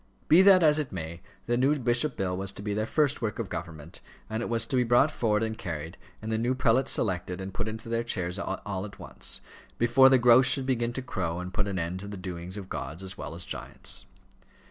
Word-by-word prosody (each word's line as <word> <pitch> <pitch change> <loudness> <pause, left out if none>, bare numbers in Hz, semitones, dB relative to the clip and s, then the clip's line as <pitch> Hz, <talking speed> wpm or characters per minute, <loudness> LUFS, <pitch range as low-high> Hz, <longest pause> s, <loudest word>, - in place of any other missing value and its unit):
Be 170 +4 +7
that 190 -2 +7
as 155 -1 +5
it 150 - -3
may, 85 -1 -6 0.2
the 120 - +1
new 135 +4 +3
bishop 125 +2 +1
bill 95 -3 -1
was 95 +1 -3
to 100 - -8
be 105 -1 -2
their 110 +1 -1
first 145 -2 +1
work 110 -3 -2
of 115 -5 -4
government, 80 -2 -7 0.3
and 110 +1 -2
it - - -3
was 115 -1 +1
to 130 - -3
be 125 - +4
brought 120 +5 +4
forward 110 -2 +1
and 110 0 -2
carried, 80 -3 -6 0.3
and 110 - -4
the 110 - 0
new 120 +3 0
prelates 130 +1 +2
selected 90 -3 0
and 95 0 -6
put 110 +3 -3
into 110 +1 -6
their 115 0 -1
chairs 90 -5 -3
all 95 -1 -4
at 100 -1 -11
once, - - -2 0.4
before 120 +3 +6
the 130 - +6
grouse 125 +1 +6
should 135 0 +4
begin 120 -3 0
to 130 - -4
crow 85 -8 -3
and 90 +1 -6
put 105 +1 0
an 100 -1 -3
end 85 +2 -3
to 100 - -7
the 100 0 -7
doings 90 +1 -6
of 100 -2 -7
gods 80 +1 -5
as 95 0 -5
well 80 - -7
as 85 +1 -4
giants. - - -3
110 Hz, 240 wpm, -28 LUFS, 95-120 Hz, 0.4 s, Be